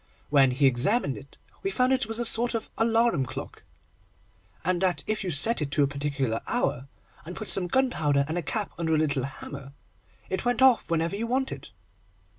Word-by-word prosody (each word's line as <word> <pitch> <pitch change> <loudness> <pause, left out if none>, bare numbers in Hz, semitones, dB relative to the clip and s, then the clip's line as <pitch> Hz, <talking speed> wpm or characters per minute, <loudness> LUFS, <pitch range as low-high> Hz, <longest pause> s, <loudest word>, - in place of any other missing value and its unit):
When 135 -2 +5
we 130 +3 +1
examined 135 - +3
it, 140 0 -13 0.2
we 390 - -2
found 255 -7 +1
it 260 -4 0
was 225 0 -4
a 240 - 0
sort 235 +1 +5
of 225 - -5
alarum 225 - +2
clock, 125 - -8 1.0
and 180 0 0
that, 180 -5 0
if 215 -1 -2
you 185 - -3
set 170 +7 +2
it 145 - -2
to 145 - +3
a - - +2
particular 140 -5 -2
hour, 140 - -1 0.4
and 175 +3 -8
put 215 - -6
some 185 -2 +3
gunpowder 160 - +1
and 160 - -3
a 175 - -1
cap 205 +6 -3
under 160 -1 +1
a - - +2
little 140 -4 0
hammer, 140 0 -9 0.5
it 190 - -3
went 245 +1 +1
off 255 -7 +4
whenever 165 +2 0
you 225 +3 -3
wanted. 265 +2 -3
175 Hz, 195 wpm, -26 LUFS, 140-230 Hz, 1.0 s, When